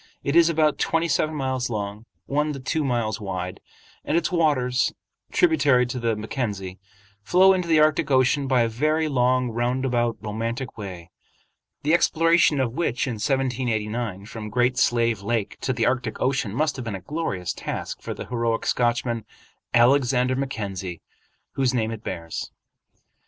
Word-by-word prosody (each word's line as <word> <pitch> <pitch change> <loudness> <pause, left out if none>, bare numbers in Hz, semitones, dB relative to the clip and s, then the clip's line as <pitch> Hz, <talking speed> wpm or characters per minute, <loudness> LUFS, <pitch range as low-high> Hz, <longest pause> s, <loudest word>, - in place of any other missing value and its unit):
It 140 - -1
is 170 -1 +6
about 155 -2 +2
twenty 165 +1 +1
seven 155 -1 0
miles 130 -3 -1
long, 105 0 -4 0.2
one 150 +2 0
to 135 - -6
two 155 +4 -1
miles 115 -5 -1
wide, 90 -2 -4 0.4
and 160 - +1
its 170 - 0
waters, 135 -7 +2 0.4
tributary 145 - +4
to 125 +1 -4
the 115 -1 0
Mackenzie, 105 -4 -4 0.4
flow 185 - +5
into 180 -2 -1
the 160 -2 +4
Arctic 155 +1 +3
Ocean 135 +1 +3
by 130 -2 +3
a - - +1
very 155 +7 0
long, 125 -2 +2
roundabout, 120 -1 0
romantic 115 +5 -4
way, 90 -5 -8 0.7
the 150 +3 +2
exploration 165 -3 +4
of 125 -3 0
which 130 -5 0
in 125 - -2
1789 120 -6 -1
from 110 -1 -7
Great 125 +3 +2
Slave 115 -4 +2
Lake 110 0 -2
to 130 - 0
the 115 -3 0
Arctic 125 -2 -1
Ocean 130 -5 0
must 150 +6 0
have 130 - -5
been 110 -4 -3
a 95 - -7
glorious 100 - -3
task - - -5
for - - -5
the - - -7
heroic 115 -2 -1
Scotchman, 120 -1 0 0.5
Alexander 125 +1 +3
Mackenzie, 100 -10 -4 0.5
whose 130 -2 0
name 110 -2 0
it 110 -1 -7
bears. 85 -1 -5
125 Hz, 155 wpm, -24 LUFS, 110-140 Hz, 0.7 s, is